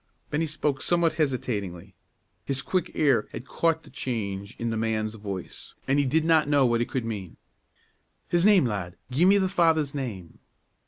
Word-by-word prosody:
Bennie 160 Hz, +2 st, 0 dB
spoke 150 Hz, -2 st, -1 dB
somewhat 170 Hz, -2 st, +2 dB
hesitatingly. 100 Hz, -, -2 dB, 0.5 s
His 135 Hz, -1 st, -1 dB
quick 185 Hz, -3 st, -1 dB
ear 135 Hz, -8 st, +3 dB
had 120 Hz, -, -6 dB
caught 165 Hz, +2 st, 0 dB
the -, -, -16 dB
change 100 Hz, -5 st, -4 dB
in 115 Hz, 0 st, -2 dB
the -, -, -1 dB
man's 110 Hz, -1 st, -1 dB
voice, 100 Hz, -4 st, -7 dB
and 135 Hz, +2 st, +3 dB
he 145 Hz, -, +2 dB
did 155 Hz, +4 st, +1 dB
not 160 Hz, -3 st, +3 dB
know 145 Hz, -2 st, +4 dB
what 120 Hz, -1 st, +2 dB
it 120 Hz, -, -2 dB
could 125 Hz, -3 st, -2 dB
mean. 100 Hz, -6 st, -6 dB, 0.9 s
"His 175 Hz, 0 st, +2 dB
name, 200 Hz, -6 st, +6 dB
lad! 100 Hz, -6 st, -3 dB, 0.2 s
gi' 150 Hz, +8 st, +3 dB
me 195 Hz, +2 st, +6 dB
the 190 Hz, -1 st, +2 dB
father's 165 Hz, -6 st, +2 dB
name!" 110 Hz, -, -6 dB
130 Hz, 175 wpm, -26 LUFS, 110-160 Hz, 0.9 s, name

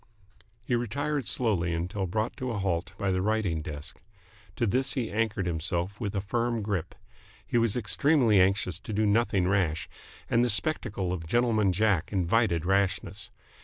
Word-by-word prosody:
He 125 Hz, -, -1 dB
retired 135 Hz, +3 st, -1 dB
slowly 95 Hz, -7 st, +1 dB
until 90 Hz, +3 st, -2 dB
brought 110 Hz, +5 st, -2 dB
to 130 Hz, -, -3 dB
a 115 Hz, -, -2 dB
halt 95 Hz, -1 st, -2 dB
by 100 Hz, -1 st, 0 dB
the 95 Hz, 0 st, 0 dB
writing 100 Hz, -6 st, 0 dB
desk. 75 Hz, -2 st, -8 dB, 0.5 s
To 120 Hz, -, 0 dB
this 130 Hz, +5 st, +1 dB
he 125 Hz, -5 st, -2 dB
anchored 105 Hz, -3 st, 0 dB
himself 85 Hz, +3 st, -2 dB
with 105 Hz, -2 st, -3 dB
a 100 Hz, -, 0 dB
firm 115 Hz, +2 st, -1 dB
grip. 95 Hz, -5 st, -3 dB, 0.5 s
He 120 Hz, -, +1 dB
was 115 Hz, -1 st, +1 dB
extremely 120 Hz, -2 st, +3 dB
anxious 95 Hz, -2 st, +1 dB
to 110 Hz, 0 st, -7 dB
do 110 Hz, +1 st, +1 dB
nothing 100 Hz, -3 st, +2 dB
rash, 90 Hz, -5 st, +1 dB, 0.4 s
and 115 Hz, +1 st, +3 dB
the 125 Hz, -, +2 dB
spectacle 105 Hz, -, 0 dB
of 80 Hz, -3 st, -5 dB
Gentleman 110 Hz, -1 st, +2 dB
Jack 95 Hz, -2 st, +1 dB
invited 95 Hz, -2 st, +1 dB
rashness. 95 Hz, +1 st, 0 dB
100 Hz, 165 wpm, -28 LUFS, 90-115 Hz, 0.5 s, extremely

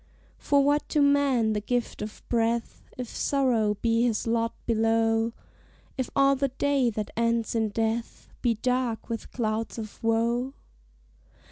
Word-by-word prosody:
For 280 Hz, -1 st, +3 dB
what 290 Hz, +1 st, +1 dB
to 300 Hz, -, +1 dB
man 280 Hz, -6 st, +3 dB
the 210 Hz, -, -1 dB
gift 245 Hz, +3 st, -2 dB
of 210 Hz, 0 st, -7 dB
breath, 230 Hz, -1 st, -1 dB
If 250 Hz, -1 st, -4 dB
sorrow 235 Hz, -6 st, +1 dB
be 230 Hz, 0 st, +3 dB
his 235 Hz, -3 st, +1 dB
lot 230 Hz, 0 st, 0 dB
below; 225 Hz, 0 st, +2 dB, 0.6 s
If 260 Hz, -2 st, -2 dB
all 275 Hz, 0 st, +5 dB
the 275 Hz, +1 st, +1 dB
day 270 Hz, -1 st, +1 dB
that 210 Hz, -2 st, -4 dB
ends 230 Hz, -1 st, +1 dB
in 220 Hz, -2 st, +1 dB
death 225 Hz, +2 st, -2 dB
Be 235 Hz, -2 st, +2 dB
dark 250 Hz, 0 st, -1 dB
with 230 Hz, -1 st, -5 dB
clouds 225 Hz, -1 st, -2 dB
of 215 Hz, -1 st, -8 dB
woe? 235 Hz, +4 st, +1 dB
230 Hz, 145 wpm, -27 LUFS, 225-255 Hz, 0.6 s, all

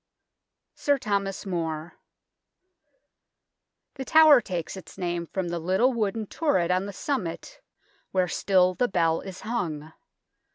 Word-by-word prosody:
SIR 285 Hz, -2 st, +1 dB
THOMAS 200 Hz, -5 st, -2 dB
MORE 165 Hz, -3 st, -3 dB, 2.0 s
The 270 Hz, -, -6 dB
tower 310 Hz, -4 st, +7 dB
takes 175 Hz, -5 st, -4 dB
its 190 Hz, -, -11 dB
name 175 Hz, -2 st, -3 dB
from 185 Hz, -1 st, -3 dB
the 170 Hz, 0 st, -2 dB
little 190 Hz, +10 st, +2 dB
wooden 220 Hz, -1 st, -1 dB
turret 190 Hz, -, 0 dB
on 185 Hz, +2 st, 0 dB
the -, -, -5 dB
summit, 195 Hz, -, -4 dB, 0.5 s
where 185 Hz, -1 st, +1 dB
still 185 Hz, +1 st, +2 dB
the 245 Hz, +7 st, +1 dB
bell 165 Hz, -4 st, +1 dB
is 190 Hz, -2 st, -9 dB
hung. 160 Hz, -9 st, -4 dB
190 Hz, 125 wpm, -26 LUFS, 170-220 Hz, 2.0 s, tower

